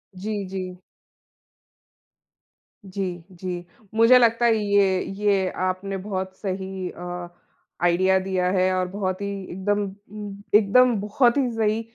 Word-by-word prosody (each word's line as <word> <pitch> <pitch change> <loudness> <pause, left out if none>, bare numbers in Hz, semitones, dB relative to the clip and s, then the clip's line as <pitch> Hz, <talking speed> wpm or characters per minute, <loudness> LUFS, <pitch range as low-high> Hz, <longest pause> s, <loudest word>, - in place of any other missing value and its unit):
जी, 205 +1 -3
जी। 185 -1 -5 2.1
जी, 185 -3 -4
जी। 180 -1 -5 0.3
मुझे 230 +3 +7
लगता 235 0 +3
है, 230 -1 +5
ये 200 -3 +2
ये 200 -3 +2 0.2
आपने 190 +1 -2
बहुत 190 -1 -4
सही 190 -1 -4
अ, 175 0 -7 0.5
आईडिया 185 +2 +4
दिया 185 -1 -1
है 185 -1 +2
और 185 0 0
बहुत 185 0 -3
ही 200 - -2 0.2
एकदम 205 +3 0
उम, 205 +1 -9
एकदम 235 +4 +5
बहुत 235 +5 +2
ही 270 - +2
सही 220 0 +1
195 Hz, 125 wpm, -24 LUFS, 185-210 Hz, 2.1 s, मुझे